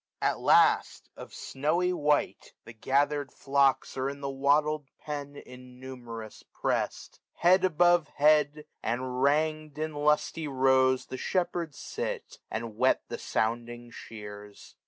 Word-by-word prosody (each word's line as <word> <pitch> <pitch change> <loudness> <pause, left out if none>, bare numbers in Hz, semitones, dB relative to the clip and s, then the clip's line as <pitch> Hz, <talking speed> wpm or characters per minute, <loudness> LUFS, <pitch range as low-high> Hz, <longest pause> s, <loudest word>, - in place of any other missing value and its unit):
At - - 0
last, - - +3
of - - -10
snowy 170 +6 -1
white, 150 -3 0
the 115 - -11
gathered 140 +3 0
flocks 140 -1 +1
Are 130 +1 -1
in 140 0 -7
the 140 -1 -4
wattled 145 +2 +1
pen 145 -1 -6
innumerous 125 -3 -10
pressM, - - -3 0.2
395 - - -21
Head 185 +2 +5
above 175 -2 +3
head: 150 0 +3 0.2
and, 120 +3 -1
rangM 150 +4 0
in 155 0 -3
lusty 150 +2 0
rows 130 -1 +3
The 130 - -7
shepherds 170 -2 -2
sit, - - -5
and 115 -1 -5
whet - - +2
the - - -5
sounding 120 +1 -2
shears. 105 -2 -11
140 Hz, 130 wpm, -28 LUFS, 125-150 Hz, 0.2 s, Head